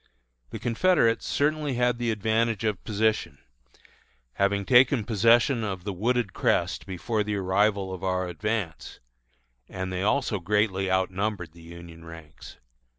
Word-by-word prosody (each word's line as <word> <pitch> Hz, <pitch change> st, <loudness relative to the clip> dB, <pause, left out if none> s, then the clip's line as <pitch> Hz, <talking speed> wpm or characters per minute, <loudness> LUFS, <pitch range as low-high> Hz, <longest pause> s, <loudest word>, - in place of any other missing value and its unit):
The -, -, -6 dB
Confederates 115 Hz, -, +1 dB
certainly 150 Hz, -2 st, 0 dB
had 125 Hz, 0 st, +1 dB
the 120 Hz, -1 st, -1 dB
advantage 110 Hz, 0 st, 0 dB
of 105 Hz, -4 st, -2 dB
position, 110 Hz, -8 st, -1 dB, 1.0 s
having 100 Hz, 0 st, 0 dB
taken 125 Hz, 0 st, +5 dB
possession 115 Hz, +3 st, +3 dB
of 95 Hz, -4 st, -4 dB
the 100 Hz, 0 st, -4 dB
wooded 115 Hz, +1 st, -1 dB
crest -, -, 0 dB
before 105 Hz, +4 st, -2 dB
the 105 Hz, 0 st, -3 dB
arrival 100 Hz, 0 st, +1 dB
of 95 Hz, -, -8 dB
our 90 Hz, -1 st, -1 dB
advance; 90 Hz, -2 st, -4 dB, 0.7 s
and 95 Hz, -1 st, -5 dB
they 90 Hz, -, -2 dB
also 105 Hz, 0 st, 0 dB
greatly 95 Hz, 0 st, 0 dB
outnumbered 95 Hz, -1 st, -1 dB
the 85 Hz, 0 st, -16 dB
Union 85 Hz, 0 st, -12 dB
ranks. 80 Hz, -5 st, -12 dB
105 Hz, 135 wpm, -26 LUFS, 95-115 Hz, 1.0 s, taken